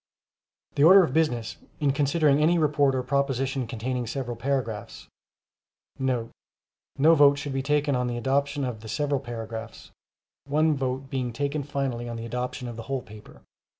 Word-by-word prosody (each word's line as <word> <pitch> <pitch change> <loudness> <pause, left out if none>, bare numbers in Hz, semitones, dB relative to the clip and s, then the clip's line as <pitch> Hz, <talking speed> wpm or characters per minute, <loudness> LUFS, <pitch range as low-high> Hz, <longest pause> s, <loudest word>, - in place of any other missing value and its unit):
The 140 - +2
order 190 +4 +9
of 135 - -2
business, 120 -8 0 0.2
in 145 -3 +2
considering 145 +1 +2
any 170 +3 +4
report 145 -3 +2
or 130 - -1
proposition 135 -1 -1
containing 120 +2 -3
several 120 0 -4
paragraphs,* 115 -4 -3 0.9
[No 125 -3 -1 0.7
vote 145 -1 +6
should 145 -1 -4
be 135 - -1
taken 145 0 +1
on 125 0 0
the 120 -1 -3
adoption 140 +3 0
of 120 -4 -4
the 110 - -9
several 145 +2 0
paragraphs,—one 120 +5 -4
vote 135 0 -3
being 130 -2 -2
taken 145 +4 -2
finally 135 -4 -3
on 115 - -5
the 115 - -6
adoption 125 +1 -4
of 120 -1 -7
the 115 - -6
whole 135 -2 -2
paper. 105 0 -14
135 Hz, 155 wpm, -26 LUFS, 120-145 Hz, 0.9 s, order